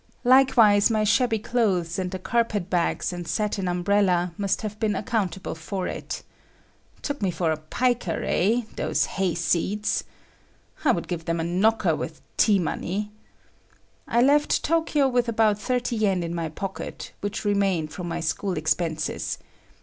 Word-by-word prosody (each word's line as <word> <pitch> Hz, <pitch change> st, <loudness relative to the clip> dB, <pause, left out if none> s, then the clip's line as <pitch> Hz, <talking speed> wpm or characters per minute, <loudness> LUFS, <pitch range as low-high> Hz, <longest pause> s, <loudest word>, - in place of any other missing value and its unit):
Likewise 240 Hz, -5 st, +6 dB
my 215 Hz, -1 st, +1 dB
shabby 225 Hz, +2 st, +3 dB
clothes 195 Hz, -7 st, 0 dB
and 185 Hz, -1 st, -2 dB
the 185 Hz, -, -4 dB
carpet 205 Hz, -1 st, -1 dB
bags 175 Hz, 0 st, 0 dB
and 175 Hz, -1 st, -6 dB
satin 195 Hz, +1 st, -1 dB
umbrella 180 Hz, -1 st, +2 dB
must 200 Hz, +2 st, -1 dB
have 215 Hz, 0 st, -5 dB
been 215 Hz, -2 st, +1 dB
accountable 195 Hz, -3 st, -2 dB
for 180 Hz, +4 st, -4 dB
it. -, -, -5 dB, 0.8 s
Took 285 Hz, -3 st, -3 dB
me 195 Hz, -, +1 dB
for 170 Hz, -2 st, 0 dB
a 155 Hz, -, -1 dB
piker, 235 Hz, +4 st, -1 dB
eh? 225 Hz, +6 st, +2 dB
those -, -, +1 dB
hayseeds! 185 Hz, +3 st, 0 dB, 0.8 s
I 285 Hz, -, +5 dB
would 170 Hz, -, -2 dB
give 170 Hz, -2 st, -4 dB
them 165 Hz, 0 st, -1 dB
a -, -, 0 dB
knocker 195 Hz, +7 st, +2 dB
with -, -, -6 dB, 0.2 s
"tea 210 Hz, -3 st, +4 dB
money." 195 Hz, +4 st, -2 dB, 1.0 s
I 235 Hz, +1 st, +3 dB
left 290 Hz, +2 st, +3 dB
Tokyo 320 Hz, -3 st, +2 dB
with 245 Hz, -2 st, +1 dB
about 215 Hz, -2 st, +2 dB
30 245 Hz, +2 st, -1 dB
yen 195 Hz, -5 st, +1 dB
in 170 Hz, 0 st, -4 dB
my 165 Hz, -2 st, -2 dB
pocket, 190 Hz, +5 st, -6 dB
which 205 Hz, +2 st, -4 dB
remained 195 Hz, -7 st, +1 dB
from 175 Hz, +2 st, -5 dB
my 170 Hz, 0 st, -3 dB
school 175 Hz, +3 st, -1 dB
expenses. 160 Hz, +1 st, -1 dB
200 Hz, 150 wpm, -25 LUFS, 175-225 Hz, 1.0 s, Likewise